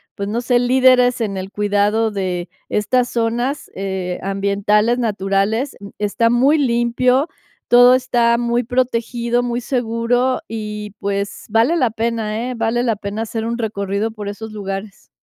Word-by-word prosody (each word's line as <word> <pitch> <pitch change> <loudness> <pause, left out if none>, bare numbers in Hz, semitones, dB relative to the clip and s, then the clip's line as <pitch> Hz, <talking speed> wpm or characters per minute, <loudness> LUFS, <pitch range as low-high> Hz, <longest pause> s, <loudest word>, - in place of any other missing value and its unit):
pues, 200 - -4
no 225 +4 -1
sé, 245 0 +2
líderes 250 0 +4
en 200 -3 -2
el 190 +1 -6
cuidado 205 +2 +1
de 185 -3 -3 0.2
estas 245 +4 +1
zonas, 240 +4 -1
eh, 190 -2 -3
ambientales, 200 +4 +1
naturales, 210 +2 0
mm, 200 - -9
está 210 +3 +1
muy 265 +6 +4
limpio, 250 +1 +2 0.4
todo 245 +1 +7
está 240 -2 +2
muy 240 0 0
protegido, 240 -1 0
muy 240 0 -2
seguro 245 +1 0
y, 210 -1 -5
pues, 200 +1 -3
vale 225 +9 +3
la 250 -7 +2
pena, 225 +1 -2
¿eh? - - -5
Vale 230 +1 0
la 230 -3 +1
pena 200 +1 -4
hacer 225 0 -3
un 235 +1 -2
recorrido 205 -1 -2
por 210 -2 -7
esos 220 +2 -7
lugares. 195 0 -6
225 Hz, 150 wpm, -19 LUFS, 205-245 Hz, 0.4 s, todo